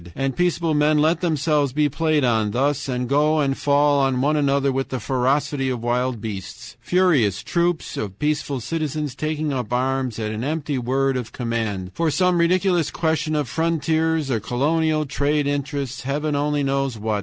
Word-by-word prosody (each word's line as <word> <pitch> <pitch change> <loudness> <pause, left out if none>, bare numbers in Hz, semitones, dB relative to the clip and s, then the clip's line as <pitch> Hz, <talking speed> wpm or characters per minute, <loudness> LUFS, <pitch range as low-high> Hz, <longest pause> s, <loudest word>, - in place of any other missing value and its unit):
And 135 -1 -1
peaceable 170 -2 +1
men 150 +1 +3
let 160 +3 +2
themselves 150 -5 +1
be 150 +1 +2
played 155 0 +1
on 110 -4 +2
thus 140 +4 0
and 125 -1 -2
go 150 +3 +2
and 135 -2 +1
fall 145 0 +3
on 135 -2 +1
one 145 +4 +2
another 140 -1 +2
with 135 0 -2
the 130 - -3
ferocity 135 +3 0
of 120 -3 -3
wild 125 0 0
beasts; 100 -3 -7
furious 150 - +2
troops 170 -1 -1
of 100 -2 -4
peaceful 150 -2 -1
citizens 155 0 -3
taking 155 +1 -2
up 125 -4 -3
arms 130 -1 -1
at 110 -1 -3
an 110 +2 -4
empty 145 -1 -2
word 135 +2 0
of 120 -3 -5
command, 110 -6 -3
for 165 -1 0
some 180 +2 +2
ridiculous 175 -1 +2
question 160 -1 -1
of 150 -3 0
frontiers 160 0 0
or 115 - +1
colonial 155 +7 0
trade 145 +1 0
interests 140 -2 -3
Heaven 145 +3 -2
only 145 0 0
knows 135 -3 -1
what... 105 0 -1
140 Hz, 175 wpm, -22 LUFS, 125-155 Hz, -, men